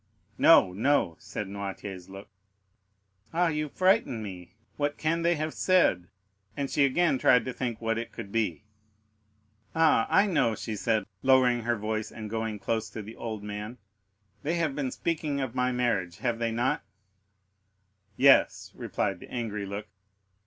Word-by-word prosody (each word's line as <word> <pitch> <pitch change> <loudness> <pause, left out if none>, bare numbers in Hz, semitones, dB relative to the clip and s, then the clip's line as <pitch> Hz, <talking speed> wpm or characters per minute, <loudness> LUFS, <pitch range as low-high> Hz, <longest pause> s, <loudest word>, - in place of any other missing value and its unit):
"No, 90 - +6
no," 110 - +1
said 100 0 -6
Noirtier's 95 -2 -6
look. 95 +1 -10 1.1
"Ah, 175 0 +3
you 150 -1 -2
frighten 185 - +2
me. 90 -4 -9 0.2
What 145 0 -1
can 165 +2 0
they 170 +1 +2
have 155 0 -3
said?" 170 - +2 0.5
and 140 -1 -2
she 145 - +4
again 140 0 +2
tried 125 -2 +4
to 130 - -4
think 120 -3 -3
what 115 0 -1
it 115 - -6
could 100 - -8
be. 105 -5 -1 1.1
"Ah, 160 -8 +4
I 200 - +5
know," 130 - +1
said 110 0 -1
she, - - -22
lowering 130 -2 +4
her 120 +1 0
voice 110 +1 -3
and 110 -2 -8
going 110 -1 -2
close 110 +2 -2
to 110 - -7
the 110 +3 -10
old 110 -3 -5
man. 105 +3 -6 0.6
"They 155 +4 -1
have 160 -5 0
been 140 -3 -1
speaking 155 -1 -2
of 130 -4 -3
my 125 0 +1
marriage,—have 120 -2 -1
they 115 -1 0
not?" 125 +6 0 1.4
"Yes," 135 +1 +4
replied - - -2
the - - -12
angry 105 -4 -4
look. 100 +2 -5
115 Hz, 155 wpm, -28 LUFS, 105-145 Hz, 1.4 s, No